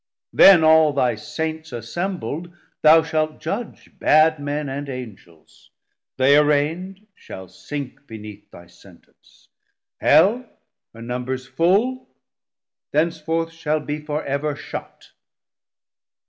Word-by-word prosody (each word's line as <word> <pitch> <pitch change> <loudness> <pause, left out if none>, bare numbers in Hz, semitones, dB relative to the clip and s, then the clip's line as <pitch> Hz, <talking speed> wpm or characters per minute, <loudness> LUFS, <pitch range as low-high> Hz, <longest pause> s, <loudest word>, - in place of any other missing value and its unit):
Then 185 -4 +7
all 160 -1 +5
thy 125 -3 +1
Saints 160 +7 -5
assembl'd, 165 - -5 0.3
thou 160 +1 +6
shalt 155 -1 -2
judge 220 +8 -5
330 - - -25
Bad 155 0 +4
men 145 +1 -3
and 140 +1 -5
Angels, 105 - -11 0.5
they 130 +2 +4
arraignd 155 +7 +1
shall 95 - -11
sink 140 +5 -8
Beneath 105 -3 -11
thy 85 - -14
Sentence; 90 0 -22 0.5
Hell, 210 +10 +4 0.5
her 115 - -10
numbers 125 +2 -4
full, 195 - 0 0.8
Thenceforth 165 +1 -1
shall 155 -1 -1
be 150 0 -5
for 150 0 -4
ever 140 +2 -2
shut. - - -9
150 Hz, 110 wpm, -21 LUFS, 130-160 Hz, 0.8 s, Then